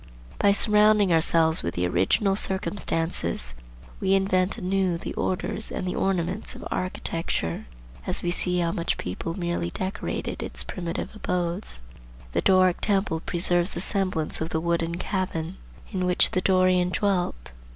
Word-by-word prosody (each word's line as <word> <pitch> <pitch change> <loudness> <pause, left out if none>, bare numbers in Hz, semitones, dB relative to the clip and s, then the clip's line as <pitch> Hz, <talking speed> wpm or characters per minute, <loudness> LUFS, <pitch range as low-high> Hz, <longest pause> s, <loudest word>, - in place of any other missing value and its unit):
By 200 - +5
surrounding 210 -2 +4
ourselves 160 0 +5
with 85 - -3
the 90 - 0
original 95 - +2
circumstances 165 - 0 0.5
we 195 0 +3
invent 190 +1 +1
anew 190 -3 0
the - - -6
orders 200 +3 -1
and 185 - -3
the 180 - -1
ornaments 190 +2 -1
of - - -7
architecture, 165 - -2 0.4
as - - 0
we 175 - +1
see 180 0 0
how 170 -1 +1
each 170 - 0
people 165 - -4
merely 175 - -1
decorated 190 - -4
its - - -4
primitive 175 -2 -4
abodes. 175 - -2 0.5
The - - 0
Doric 185 -2 +4
temple 195 -5 +1
preserves 175 +2 0
the - - -2
semblance 185 -8 -1
of 160 - -2
the 160 - -1
wooden 170 0 0
cabin 180 -2 -3 0.3
in 185 -3 -1
which 180 - +3
the 185 - +1
Dorian 185 -1 +3
dwelt. 180 - -1
180 Hz, 145 wpm, -25 LUFS, 165-195 Hz, 0.5 s, By